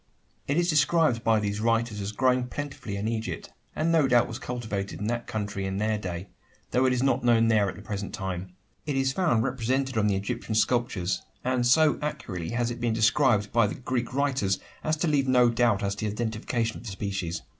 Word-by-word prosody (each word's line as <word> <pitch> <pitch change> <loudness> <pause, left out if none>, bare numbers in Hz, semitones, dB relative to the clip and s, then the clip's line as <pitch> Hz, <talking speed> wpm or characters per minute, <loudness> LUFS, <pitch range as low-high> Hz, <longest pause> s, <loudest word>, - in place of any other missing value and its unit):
It 145 - 0
is 175 0 +2
described 155 -5 +3
by 110 -1 +3
these 105 0 -2
writers 115 -2 +1
as 100 +1 -3
growing 125 +2 +2
plentifully 135 -6 -5
in 100 +2 -2
Egypt; 115 0 -4 0.2
and 160 +2 +1
no 160 -4 +4
doubt 120 -2 +4
was 115 +1 -6
cultivated 110 -7 -4
in 105 - -3
that 120 +2 -2
country 105 -2 -3
in 95 0 -2
their 110 +1 0
day; 90 -1 -5 0.4
though 130 +1 +3
it 130 - +3
is 125 0 0
not 135 -2 +2
known 115 -1 +4
there 105 -3 +3
at - - -7
the 105 - -11
present 100 -1 -4
time. 95 -1 -5 0.3
It 145 - -1
is 135 0 +1
found 155 -12 +2
represented 130 0 0
on 105 - +2
the 100 - +2
Egyptian 110 +3 -3
sculptures, 110 -5 +1 0.2
and 125 -1 +1
so 155 +4 +4
accurately 95 - -4
has 120 0 -1
it 120 - -7
been 120 -2 +1
described 110 -1 +3
by 115 -3 +4
the - - -4
Greek 125 -1 -2
writers, 130 -8 +1 0.3
as 155 0 0
to 170 - 0
leave 140 -3 +2
no 125 -2 +5
doubt 115 -4 +2
as 100 0 0
to 110 - -3
the - - -1
identification 115 +1 -2
of - - -11
the - - -6
species. 95 -4 -3
115 Hz, 215 wpm, -27 LUFS, 105-130 Hz, 0.4 s, no